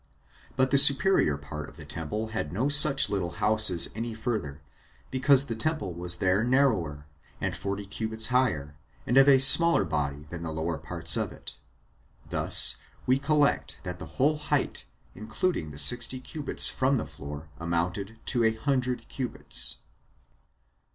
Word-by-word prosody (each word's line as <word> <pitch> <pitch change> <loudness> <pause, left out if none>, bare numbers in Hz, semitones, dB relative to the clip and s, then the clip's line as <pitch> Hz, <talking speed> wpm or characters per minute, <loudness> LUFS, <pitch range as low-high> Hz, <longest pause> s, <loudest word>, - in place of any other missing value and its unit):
But 130 0 0
the 140 - +4
superior 140 - +5
part 75 +1 -10
of - - -20
the 75 - -10
temple 85 +9 -6
had 110 -9 -5
no 115 +10 -2
such 145 -1 +7
little 95 -4 -5
houses 105 -2 +3
any 115 +1 -7
further, 100 - -6 0.5
because 135 +1 +2
the 115 -4 -6
temple 155 - -3
was 85 +1 -4
there 95 +3 -1
narrower, 110 - -1 0.3
and - - -4
forty 100 +1 -6
cubits 110 +2 -4
higher, 75 - -1 0.3
and 120 - -2
of 135 +1 +5
a 135 - +5
smaller 155 0 +7
body 75 -3 -4
than 85 -1 -8
the 80 -1 -6
lower 80 0 -5
parts 80 0 +1
of - - -3
it. - - -11 0.7
Thus - - +4 0.3
we 130 +1 0
collect 145 0 -1
that 90 -1 -7
the - - -10
whole 150 +3 0
height, 150 - -3 0.3
including 110 - -4
the 75 - -12
sixty 120 - +4
cubits 145 +2 -1
from 130 +1 -1
the 115 - -5
floor, 75 +1 -11
amounted 90 +6 -4
to 120 -3 0
a 110 0 0
hundred 125 +1 -3
cubits. 120 - -3
110 Hz, 155 wpm, -25 LUFS, 80-130 Hz, 0.7 s, such